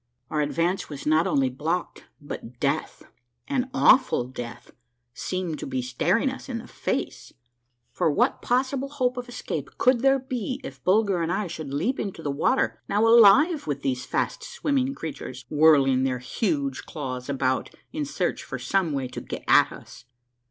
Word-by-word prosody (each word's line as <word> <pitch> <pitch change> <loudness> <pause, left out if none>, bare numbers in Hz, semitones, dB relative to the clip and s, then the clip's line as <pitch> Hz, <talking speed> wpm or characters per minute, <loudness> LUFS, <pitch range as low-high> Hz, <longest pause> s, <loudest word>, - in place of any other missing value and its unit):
Our 150 - +1
advance 170 +5 0
was 145 -2 -7
not 155 +2 +3
only 135 -2 +2
blocked, 160 +7 -3
but 125 -4 -8
death, - - -1 0.4
an 265 -2 -1
awful 260 - +4
death, 120 -1 -8 0.4
seemed 175 +2 -3
to - - -5
be 130 -2 -2
staring 170 - +1
us 265 - -9
in 240 - -2
the 230 - -8
face; - - -4 0.6
for - - +1
what 145 - +1
possible 260 +2 0
hope 255 -3 0
of 245 -1 -6
escape 245 - -5
could 255 -1 +4
there 270 +2 +4
be 255 -1 -4
if - - -9
Bulger 195 -2 +3
and 165 +1 -1
I 200 +3 0
should 160 -5 -6
leap 220 - -1
into 190 -5 -4
the 145 - -1
water, 205 - +1
now 205 +3 +3
alive 235 - +6
with 145 -2 -3
these 130 -2 -1
fast - - -2
swimming 275 -1 -1
creatures, 130 - -7
whirling 145 -4 +5
their 130 -1 0
huge 140 - -2
claws 130 -4 -5
about 130 -2 0 0.2
in 305 0 -2
search 290 - -2
for - - -5
some 190 -6 0
way 135 -2 -2
to - - -7
get - - -7
at - - +6
us. - - -12
170 Hz, 170 wpm, -25 LUFS, -, 0.6 s, alive